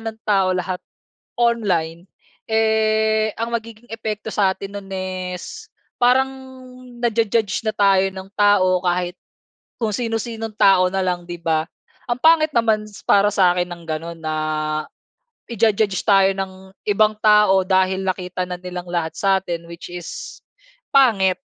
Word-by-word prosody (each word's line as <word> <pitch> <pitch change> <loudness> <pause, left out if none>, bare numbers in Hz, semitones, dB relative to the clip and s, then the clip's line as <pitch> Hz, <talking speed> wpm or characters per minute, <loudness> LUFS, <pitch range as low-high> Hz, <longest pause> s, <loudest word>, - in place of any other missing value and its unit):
ng 225 0 -6
tao 190 -3 +2
lahat 180 0 -3 0.6
online, 185 -8 0 0.4
eh, 220 -1 +2
ang 230 +1 -3
magiging 230 0 -6
epekto 220 -1 -4
sa 195 -2 +2
atin 200 +1 -7
nun 195 - -15
is 185 - -5 0.3
parang 255 +2 +4 0.7
naju-judge 225 -3 +1
na 215 - -1
tayo 195 -1 +4
ng 190 0 -9
tao 190 -3 +4
kahit, 180 0 -1 0.6
kung 220 -2 0
sinu-sinong 225 -1 -3
tao 190 -2 +5
na 195 - 0
lang, 175 -1 -2
'di 175 - -5
ba? 160 -1 0 0.4
Ang 240 - 0
pangit 315 -1 +5
naman 220 -2 +2
s 205 - -14
para 200 0 +4
sakin 180 -2 +2
ng 170 -1 -8
ganun 165 +1 -5
na 155 0 -1 1.2
ija-judge 215 -3 +1
tayo 195 -2 +5
ng 190 0 -7
ibang 215 +1 +3
tao 210 -3 +5
dahil 190 0 +1
nakita 180 -1 -2
na 180 - -4
nilang 180 -1 -6
lahat 170 -2 -2
satin, 190 -4 0
which 170 0 -9
is 175 -2 -8 0.5
pangit 200 -9 +4
195 Hz, 135 wpm, -21 LUFS, 180-220 Hz, 1.2 s, tao